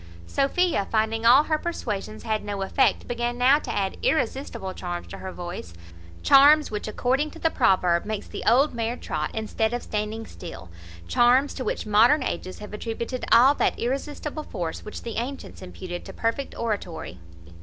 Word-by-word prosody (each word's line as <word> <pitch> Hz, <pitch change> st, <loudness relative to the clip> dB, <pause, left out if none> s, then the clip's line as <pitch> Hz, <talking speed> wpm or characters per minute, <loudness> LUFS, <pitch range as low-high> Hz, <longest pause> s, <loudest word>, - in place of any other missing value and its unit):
Sophia, 275 Hz, -, +1 dB
finding 225 Hz, +1 st, +1 dB
all 260 Hz, +5 st, +8 dB
her 310 Hz, 0 st, 0 dB
persuasions 215 Hz, -, -4 dB
had 220 Hz, -1 st, -1 dB
no 200 Hz, -1 st, -3 dB
effect, 265 Hz, +7 st, +1 dB
began 240 Hz, 0 st, -2 dB
now 260 Hz, +4 st, +5 dB
to -, -, -5 dB
add 195 Hz, -1 st, -1 dB
irresistible 265 Hz, -9 st, -1 dB
charms 175 Hz, -1 st, -5 dB
to -, -, -9 dB
her 190 Hz, -, -6 dB
voice; 175 Hz, -, -7 dB, 0.5 s
charms 290 Hz, +1 st, +6 dB
which, 210 Hz, 0 st, -4 dB
according 260 Hz, +7 st, 0 dB
to 330 Hz, -, -12 dB
the 325 Hz, 0 st, +1 dB
proverb, 180 Hz, -7 st, +3 dB
makes 215 Hz, -1 st, -4 dB
the -, -, -7 dB
old 265 Hz, +6 st, +4 dB
mare 235 Hz, +1 st, -2 dB
trot, 155 Hz, -1 st, -3 dB
instead 220 Hz, +1 st, -1 dB
of 245 Hz, -, -4 dB
standing 215 Hz, +1 st, -3 dB
still; 130 Hz, -, -10 dB, 0.4 s
charms! 250 Hz, -, +4 dB
to 260 Hz, -, -5 dB
which -, -, -2 dB
modern 230 Hz, +7 st, +5 dB
ages 185 Hz, -, -4 dB
have 210 Hz, 0 st, -10 dB
attributed 230 Hz, +3 st, -4 dB
all 250 Hz, +5 st, +7 dB
that -, -, 0 dB
irresistible 290 Hz, +4 st, -3 dB
force 175 Hz, -, -5 dB
which 210 Hz, -, -8 dB
the 230 Hz, -, -5 dB
antients 260 Hz, +4 st, -5 dB
imputed 180 Hz, -1 st, -7 dB
to -, -, -9 dB
perfect 230 Hz, +4 st, -2 dB
oratory. 180 Hz, -, -4 dB
225 Hz, 170 wpm, -25 LUFS, 200-270 Hz, 0.5 s, all